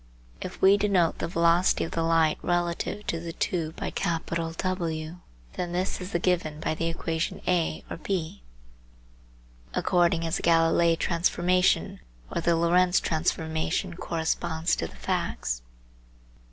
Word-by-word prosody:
If - - -6
we 195 +1 +7
denote 195 -5 +2
the - - -1
velocity 170 +1 +3
of - - -5
the 165 - -1
light 165 -1 +3
relative 175 +4 -1
to 165 - -2
the 165 0 -6
tube 160 -2 -2
by - - -4
W, 165 0 -2 0.4
then 175 -1 -3
this 185 +2 -1
is 180 +2 -6
given 170 -4 0
by 155 - -1
the 165 +1 -2
equation 165 0 -2
(A) 175 -3 0
or - - -6
(B), 165 - -3 1.3
according 170 -1 +2
as 165 - 0
the - - -5
Galilei 165 0 +4
transformation 175 - +1 0.3
or - - -1
the 170 0 +3
Lorentz 175 +2 +3
transformation 160 +2 -1
corresponds 165 0 -1
to 80 - -2
the 70 - -15
facts. - - -2
170 Hz, 135 wpm, -27 LUFS, 160-180 Hz, 1.3 s, we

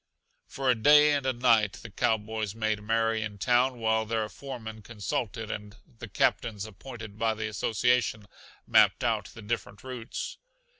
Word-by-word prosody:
For 135 -1 +1
a - - +5
day 150 +6 +6
and 140 -2 0
a - - +3
night 115 -4 +3
the 110 - -10
cowboys 110 0 -1
made 110 -2 -1
merry 115 +1 +1
in 105 -2 -5
town 125 +5 +2
while 110 -1 +1
their 110 0 -1
foremen 110 -6 -8
consulted 105 0 -4
and 105 +1 -7 0.2
the 115 - -7
captains 105 +1 0
appointed 110 0 -10
by 115 -1 +1
the 110 0 -3
Association 110 +1 +1 0.4
mapped - - +4
out - - +1
the 110 - -12
different 105 -1 -4
routes. 125 -3 -6
110 Hz, 155 wpm, -28 LUFS, 105-120 Hz, 0.4 s, day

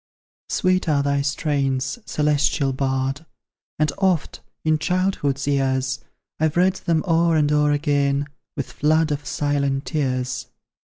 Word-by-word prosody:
Sweet 185 -2 +1
are 140 -2 +2
thy 140 0 +1
strains, 140 - -1
celestial 145 -2 +1
Bard; 135 +2 -1 0.5
And 155 -1 +2
oft, 185 -5 +1 0.3
in 155 -1 +3
childhood's 155 -5 0
years, 130 -2 0 0.4
I've 155 +1 +1
read 185 +1 +4
them 165 -3 0
o'er 165 0 +3
and 150 -1 +2
o'er 150 0 +3
again, 145 -1 +1 0.3
With 140 - -4
floods 155 +1 +2
of 145 0 -3
silent 140 -1 0
tears. 130 -4 -2
145 Hz, 125 wpm, -22 LUFS, 140-155 Hz, 0.5 s, read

